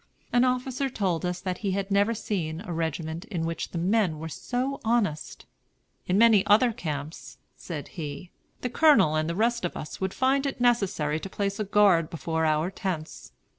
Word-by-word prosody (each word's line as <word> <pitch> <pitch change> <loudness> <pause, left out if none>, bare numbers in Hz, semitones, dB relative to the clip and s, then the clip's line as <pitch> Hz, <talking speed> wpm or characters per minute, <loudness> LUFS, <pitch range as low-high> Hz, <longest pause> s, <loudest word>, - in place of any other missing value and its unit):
An 245 0 +5
officer 255 +1 0
told 185 -7 -1
us 180 0 -3
that 185 -1 -3
he 200 -3 -1
had 195 +1 -3
never 200 +3 +3
seen 165 -6 -3
a 190 -5 -6
regiment 160 +1 -3
in 170 -6 -3
which 165 0 -3
the - - -5
men 185 -1 +1
were 160 +1 -6
so 255 - -3
honest. 220 -9 -1 0.6
"In 185 - +2
many 220 -3 +6
other 225 +4 +5
camps," 150 -4 -6 0.2
said 155 -5 -7
he, 160 +1 -7 0.3
"the 250 - -2
Colonel 250 - +5
and 155 +1 0
the 170 - -2
rest 235 +3 +1
of 175 - -3
us 150 - -7
would 190 0 -2
find 270 +2 +2
it 275 - -4
necessary 195 -11 +1
to 195 - -7
place 200 +1 -2
a - - +1
guard 195 -5 +4
before 160 0 -2
our 155 +3 +1
tents. 185 -6 -5
190 Hz, 185 wpm, -27 LUFS, 160-225 Hz, 0.6 s, many